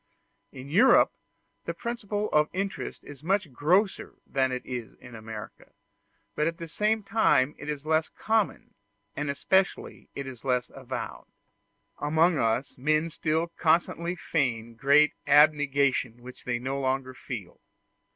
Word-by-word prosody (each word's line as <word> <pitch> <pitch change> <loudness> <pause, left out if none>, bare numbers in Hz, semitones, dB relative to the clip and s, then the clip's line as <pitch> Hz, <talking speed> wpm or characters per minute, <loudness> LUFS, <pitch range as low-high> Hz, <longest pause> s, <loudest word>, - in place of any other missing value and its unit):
In 130 +1 -10
Europe 200 - +5 0.5
the - - -3
principle 215 -3 -3
of 150 0 +3
interest 195 0 -4
is 145 -1 -11
much 185 -3 0
grosser 185 - +1
than 130 -1 0
it 125 0 -4
is 120 -3 -6
in 125 - -14
America, 110 -1 -9 0.6
but 150 - 0
at 165 0 -2
the 165 - -7
same 215 +6 0
time 150 -11 +3
it - - -7
is 150 -1 -4
less 155 0 +1
common, 220 -2 -1 0.4
and 150 -1 -2
especially 190 +7 0
it 140 - -4
is 130 -3 -9
less 125 -2 0
avowed; - - -6 0.7
amongst 160 +2 +3
us, 115 +4 0
men 155 +4 +1
still 160 +1 -1
constantly 170 +1 +1
feign 120 -9 -1
great 140 +6 +4
abnegation 140 -4 +3
which 125 0 -12
they 120 -1 0
no 135 +3 -3
longer 130 -1 -1
feel. 115 -8 -8
145 Hz, 140 wpm, -27 LUFS, 130-170 Hz, 0.7 s, Europe